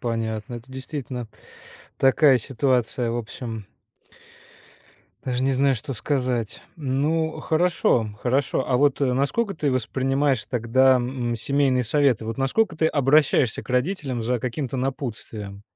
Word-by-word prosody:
понятно. 115 -1 -3
Это, 120 +2 -10
действительно, 130 -3 -6 0.7
такая 135 0 +5
ситуация, 125 -1 0
в 115 - -2
общем 115 -2 -6 1.6
даже 125 0 -2
не 135 - +2
знаю, 135 +1 +3
что 125 +3 -5
сказать. 125 -3 -2
Ну 155 +3 -1
хорошо, 160 -9 +2
хорошо. 130 +1 +1
А 125 - +2
вот, 145 0 +2
э, 130 -2 +2
насколько 145 - 0
ты 150 -2 0
воспринимаешь 135 +1 0
тогда, 130 +2 +3
м, 120 -1 -1
семейные 135 +1 +1
советы: 135 -3 +2
вот 115 +4 -5
насколько 165 +9 +1
ты 160 0 +1
обращаешься 145 -4 +3
к - - -19
родителям 130 -1 -1
за 125 +2 0
каким-то 130 +1 -3
напутствием? 115 -7 -5
130 Hz, 130 wpm, -24 LUFS, 120-140 Hz, 1.6 s, такая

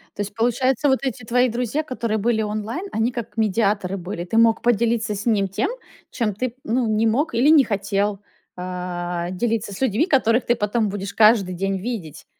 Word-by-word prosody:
То - - -3
есть, 205 0 -5
получается, 255 +4 +1
вот 265 - +3
эти 260 -3 -3
твои 245 +3 +2
друзья, 245 +5 -1
которые 235 -6 -2
были 220 +1 +1
онлайн, 215 - -4
они 225 +3 0
как 235 -3 -6
медиаторы 205 -3 0
были. 175 -1 -5
Ты 205 +5 -2
мог 230 -1 +4
поделиться 230 -2 +1
с 205 - -6
ним 210 -4 +2
тем, 195 - -1 0.4
чем 215 -5 -1
ты, 255 +5 -1
м, - - -7
ну, 235 +2 0
не 215 +1 +2
мог 270 +9 0
или 250 +6 +3
не 310 -3 +7
хотел, 200 -1 -1 0.3
а, 180 -1 -4
делиться 220 +1 -2
с 190 - -9
людьми, 260 +3 +2
которых 255 -7 +2
ты 240 - +2
потом 215 0 0
будешь 200 0 -5
каждый 215 -4 +4
день 195 +1 -1
видеть. 195 - -6
220 Hz, 195 wpm, -22 LUFS, 200-240 Hz, 0.4 s, не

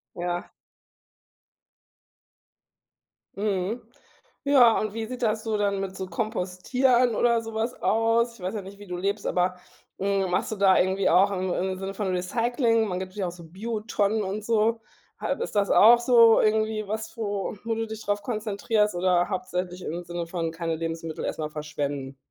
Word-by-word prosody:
Ja. 175 0 -3 2.9
Mhm. 205 +2 -1 0.6
Ja, 260 -5 +6
und 215 -1 -2
wie 225 -1 -3
sieht 250 +1 -7
das 220 -1 +1
so 220 -2 0
dann 200 -1 0
mit 190 -1 -5
so 190 - -4
Kompostieren 225 +6 +1
oder 235 0 +3
so 225 0 -8
was 225 +3 -1
aus? 230 +1 +2
Ich - - -18
weiß 185 +4 -3
ja 205 - -3
nicht, 195 +2 -11
wie 205 - -11
du 180 - -4
lebst, 200 +3 -2
aber, 180 0 +1 0.4
hm, 195 -1 0
machst 180 - 0
du - - -2
da 195 -1 +5
irgendwie 190 +2 +2
auch 195 +2 +5
im 185 -1 -1
im 185 0 -2
Sinne 195 0 -5
von 200 -1 -2
Recycling 230 +5 +1
man 180 -1 -2
gibt's 190 +1 -7
ja 195 -3 -1
auch 175 - -6
so 175 -1 -12
Biotonnen 210 +3 -1
und 200 +2 -4
so. 225 0 +2 0.4
Ha - - -3
ist 470 - -4
das 200 -1 +2
auch 235 +3 +7
so 235 -2 +6
irgendwie 215 0 +1
was, 220 +1 -4
wo 205 -2 -3
wo 230 0 -1
du 225 0 -2
dich 220 0 -8
drauf 205 0 -1
konzentrierst 210 -1 0
oder 175 0 +2
hauptsächlich 180 -1 -3
im 170 +3 -4
Sinne 175 -1 -4
von 165 -1 -3
keine 165 -1 -2
Lebensmittel 165 -1 -4
erst - - -3
mal 155 -1 -2
verschwenden? 145 -3 -4
200 Hz, 180 wpm, -26 LUFS, 180-225 Hz, 2.9 s, auch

